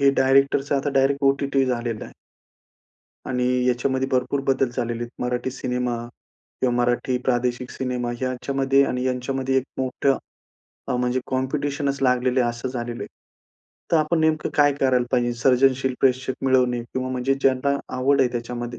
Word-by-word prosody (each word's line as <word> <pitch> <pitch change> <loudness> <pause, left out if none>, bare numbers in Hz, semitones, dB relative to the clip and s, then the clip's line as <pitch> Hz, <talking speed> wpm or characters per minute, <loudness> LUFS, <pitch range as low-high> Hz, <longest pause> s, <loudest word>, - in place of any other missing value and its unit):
हे 140 0 +5
डायरेक्टरच 135 +1 +3
आता 140 +1 0
direct 140 +1 +2
OTT 135 0 +2
झालेलं 120 -3 -2
आहे. - - -12 1.2
आणि 125 -1 0 0.2
याच्यामध्ये 130 +2 0
भरपूर 130 +2 0
बदल 135 -1 +2
झालेले 120 0 -2
आहेत. 120 - -7
मराठी 125 +1 -2
सिनेमा 125 -2 -2 0.6
किंवा 125 -2 +2
मराठी 120 +1 +1
प्रादेशिक 125 0 0
सिनेमा. 125 -2 -3
याच्यामध्ये 135 +2 +1
आणि 125 0 -2
यांच्यामध्ये 130 +1 -1
एक 130 - +1 0.2
मोठं 130 +1 +1 0.7
अ, - - 0
म्हणजे 125 +1 0
कॉम्पिटिशनच 140 +1 -1
लागलेलं 125 0 +2
आहे, 120 - +2
असं 120 +2 -5
झालेलं 120 -2 -5
आहे. - - -7 0.8
तर 165 - +6
आपण 160 +1 +1
नेमकं 155 -1 +1
काय 145 -1 +5
करायला 130 -3 +2
पाहिजे? 120 -1 +2
सर्जनशील 130 0 +3
प्रेक्षक 130 0 +2
मिळवणे 125 -2 +3
किंवा 130 +2 -4
म्हणजे 130 +1 0
ज्यांना 135 +1 +2 0.2
आवड 135 +2 +3
आहे 130 - +4
त्याच्यामध्ये 120 0 -5
130 Hz, 150 wpm, -23 LUFS, 125-135 Hz, 1.2 s, तर